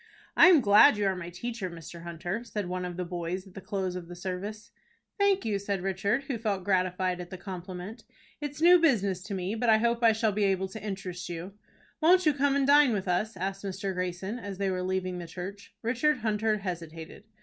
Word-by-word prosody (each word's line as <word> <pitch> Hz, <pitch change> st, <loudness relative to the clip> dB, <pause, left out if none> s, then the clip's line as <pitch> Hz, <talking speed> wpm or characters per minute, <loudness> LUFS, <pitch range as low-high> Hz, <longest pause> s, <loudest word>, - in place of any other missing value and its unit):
"I -, -, +8 dB
am 345 Hz, -6 st, +7 dB
glad 210 Hz, -1 st, +7 dB
you 205 Hz, -, 0 dB
are 190 Hz, -1 st, +1 dB
my 175 Hz, -1 st, -6 dB
teacher, 210 Hz, +2 st, -5 dB
Mr. 170 Hz, 0 st, -10 dB
Hunter," 175 Hz, +6 st, -4 dB
said 210 Hz, -5 st, -4 dB
one 180 Hz, 0 st, -3 dB
of 180 Hz, -1 st, -6 dB
the 180 Hz, -, -2 dB
boys 175 Hz, +2 st, -4 dB
at 190 Hz, -, -16 dB
the 195 Hz, -, -8 dB
close 190 Hz, -2 st, -3 dB
of 180 Hz, -2 st, -6 dB
the 175 Hz, -, -9 dB
service. 190 Hz, +4 st, -6 dB, 0.5 s
"Thank 400 Hz, -1 st, +3 dB
you," 205 Hz, -3 st, 0 dB
said 200 Hz, -2 st, -3 dB
Richard, 200 Hz, +7 st, 0 dB
who 270 Hz, -4 st, -4 dB
felt 205 Hz, -4 st, -1 dB
gratified 185 Hz, -1 st, 0 dB
at 175 Hz, -, -9 dB
the 185 Hz, -, -7 dB
compliment. 185 Hz, +4 st, -7 dB, 0.4 s
"It's 290 Hz, +1 st, -4 dB
new 355 Hz, +1 st, +8 dB
business 200 Hz, -, +2 dB
to 200 Hz, -, -4 dB
me, 185 Hz, +2 st, -2 dB
but 230 Hz, +1 st, 0 dB
I 220 Hz, -, +7 dB
hope 235 Hz, +1 st, +1 dB
I 225 Hz, -1 st, +6 dB
shall 220 Hz, 0 st, +1 dB
be 205 Hz, 0 st, +1 dB
able 190 Hz, -1 st, 0 dB
to 220 Hz, +3 st, -8 dB
interest 190 Hz, -4 st, -5 dB
you." 175 Hz, +3 st, -6 dB, 0.5 s
"Won't 360 Hz, +3 st, +5 dB
you 305 Hz, -, +5 dB
come 280 Hz, 0 st, +2 dB
and 280 Hz, -1 st, +2 dB
dine 285 Hz, -3 st, +6 dB
with 195 Hz, -2 st, -2 dB
us?" 210 Hz, +5 st, 0 dB
asked 195 Hz, +2 st, -3 dB
Mr. 195 Hz, 0 st, -3 dB
Greyson, 185 Hz, +5 st, -3 dB
as 200 Hz, -4 st, -6 dB
they 195 Hz, -1 st, 0 dB
were 185 Hz, 0 st, -2 dB
leaving 185 Hz, -1 st, -2 dB
the 170 Hz, -, -7 dB
church. 190 Hz, +4 st, -8 dB
Richard 255 Hz, +6 st, +2 dB
Hunter 215 Hz, 0 st, +1 dB
hesitated. 170 Hz, -1 st, -7 dB
195 Hz, 220 wpm, -28 LUFS, 180-225 Hz, 0.5 s, I